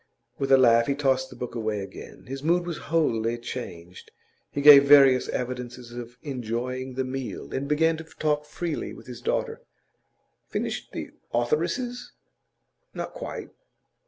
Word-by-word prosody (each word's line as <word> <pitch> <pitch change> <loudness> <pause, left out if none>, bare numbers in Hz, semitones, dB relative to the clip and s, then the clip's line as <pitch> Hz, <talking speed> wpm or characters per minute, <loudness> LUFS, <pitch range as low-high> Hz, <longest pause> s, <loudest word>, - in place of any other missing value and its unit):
With 135 -1 -1
a 135 - +9
laugh 115 -2 +5
he 140 - +1
tossed 130 -2 +1
the - - -12
book 125 - -6
away 110 -3 -2
again. 95 - -10
His 135 +1 -6
mood 175 +3 +2
was 170 -2 -4
wholly 120 -8 +1
changed. 90 -8 -8 0.4
He - - -4
gave 140 -1 +10
various 135 -3 +7
evidences 125 -1 -4
of 120 0 -8
enjoying 125 0 -4
the 130 - 0
meal, 130 -4 -5
and 135 +1 -2
began 160 +2 +2
to 160 - -7
talk 150 -2 -1
freely 165 +1 -4
with - - -13
his 120 -2 -9
daughter. - - -1 0.9
'Finished - - -3
the - - -6 0.2
authoresses?' 170 - -1 0.8
'Not - - -5
quite. - - -7
130 Hz, 150 wpm, -26 LUFS, 120-150 Hz, 0.9 s, gave